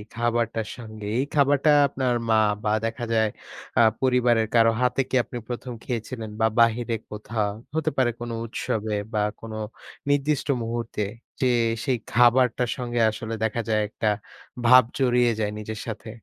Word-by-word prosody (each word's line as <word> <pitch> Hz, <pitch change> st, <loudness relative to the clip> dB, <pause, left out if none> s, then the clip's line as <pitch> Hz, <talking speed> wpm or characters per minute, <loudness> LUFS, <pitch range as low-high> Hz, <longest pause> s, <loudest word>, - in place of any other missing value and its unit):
খাবারটার 115 Hz, -2 st, 0 dB
সঙ্গে, 110 Hz, -3 st, -9 dB
এই 135 Hz, -, +1 dB
খাবারটা 145 Hz, +1 st, +3 dB, 0.2 s
আপনার 130 Hz, -2 st, -1 dB
মা 110 Hz, -, +5 dB, 0.3 s
বা 105 Hz, -, +1 dB
দেখা 115 Hz, +1 st, -3 dB
যায় 110 Hz, -1 st, +3 dB, 0.5 s
আ -, -, +7 dB, 0.2 s
পরিবারের 125 Hz, -3 st, +3 dB
কারো 115 Hz, 0 st, +6 dB
হাতে 125 Hz, +1 st, +2 dB
কি -, -, -1 dB
আপনি 120 Hz, -, -8 dB
১ম 125 Hz, +1 st, -5 dB
খেয়েছিলেন? 115 Hz, -1 st, -4 dB
বা 110 Hz, -, +3 dB
বাহিরে 115 Hz, 0 st, +3 dB, 0.2 s
কোথাও? 105 Hz, 0 st, -2 dB, 0.2 s
হতে 160 Hz, -2 st, +1 dB
পারে 125 Hz, -2 st, +3 dB
কোন 120 Hz, 0 st, -5 dB, 0.2 s
উৎসবে? 110 Hz, -1 st, -2 dB, 0.2 s
বা 105 Hz, -, +1 dB, 0.2 s
কোন 115 Hz, -1 st, -8 dB, 0.6 s
নির্দিষ্ট 145 Hz, 0 st, +1 dB, 0.2 s
মুহূর্তে? 115 Hz, -2 st, -3 dB, 0.4 s
যে, 130 Hz, -, +3 dB, 0.4 s
সেই 130 Hz, -2 st, +1 dB
খাবারটার 120 Hz, 0 st, +4 dB
সঙ্গে 120 Hz, -1 st, -2 dB
আসলে 110 Hz, +1 st, -6 dB
দেখা 110 Hz, +1 st, 0 dB
যায় 110 Hz, -1 st, +2 dB
একটা 110 Hz, 0 st, -1 dB, 0.6 s
ভাব 130 Hz, +1 st, +8 dB
জড়িয়ে 125 Hz, -2 st, +3 dB
যায় 105 Hz, -1 st, 0 dB
নিজের 110 Hz, 0 st, -6 dB
সাথে। 110 Hz, 0 st, -6 dB
120 Hz, 150 wpm, -25 LUFS, 110-125 Hz, 0.6 s, ভাব